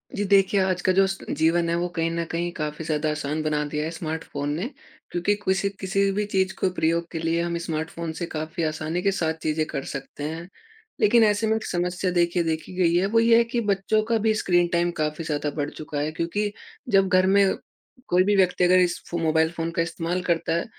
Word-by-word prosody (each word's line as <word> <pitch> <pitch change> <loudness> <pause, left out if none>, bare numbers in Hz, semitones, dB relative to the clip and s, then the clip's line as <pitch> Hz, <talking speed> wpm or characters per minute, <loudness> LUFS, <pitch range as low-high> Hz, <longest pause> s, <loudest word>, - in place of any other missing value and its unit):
जी 205 - -1
देखिए, 195 0 +4
आज 185 -1 0
का 185 - +2
जो 195 +1 +5
स 190 0 -3
जीवन 165 +3 +2
है 170 - +1
वो 175 +1 0
कहीं 165 0 +1
न 170 0 -1
कहीं 170 +1 -2
काफ़ी 150 +1 -4
ज़्यादा 155 0 0
आसान 150 +1 -2
बना 150 -1 0
दिया 150 0 -1
है - - -2
स्मार्टफ़ोन 160 -3 -4
ने। 180 +9 -2 0.4
क्योंकि 175 +4 +1
कुसी 200 -1 0
किसी 195 +1 +1
भी 205 +2 -1
चीज़ 190 -2 0
को 190 - +2
प्रयोग 170 0 0
के 165 - -4
लिए 165 +1 0
हम 170 0 -2
स्मार्टफ़ोन 165 0 -4
से 175 - -2
काफ़ी 160 +2 -4
आसानी 160 +2 -2
के 195 - +2
साथ 165 -4 0
चीज़ें 155 0 0
कर 135 - -3
सकते 140 +1 -7
हैं। 160 +3 -5 0.5
लेकिन 225 +2 +5
ऐसे 210 +1 +2
में 220 - +2
एक 220 - -3
समस्या 180 +1 -1
देखिए 175 0 +2
देखी 160 +2 -3
गई 170 -2 +3
है 180 +2 +3
वो 225 +3 +3
ये 230 0 +5
है 235 - +5
कि 235 +1 -2
बच्चों 205 0 +1
का 225 +1 +1
भी 220 0 +2
स्क्रीन 175 -4 +2
टाइम 170 0 +2
काफ़ी 150 +2 -2
ज़्यादा 150 -1 -1
बढ़ 145 0 -1
चुका 150 -1 -6
है, 150 +2 -1
क्योंकि 170 +6 -2 0.4
जब 195 -3 +4
घर 185 0 +4
में 195 0 +4 0.5
कोई 180 +1 +4
भी 205 +2 +2
व्यक्ति 185 -2 +3
अगर 180 +1 +5
इस 175 -1 +1
फ़ो 170 - -2
मोबाइल 160 -1 +2
फ़ोन 165 -1 -3
का - - +2
इस्तेमाल 165 +2 -2
करता 170 -2 0
है, 170 - -1
175 Hz, 230 wpm, -24 LUFS, 160-195 Hz, 0.5 s, जो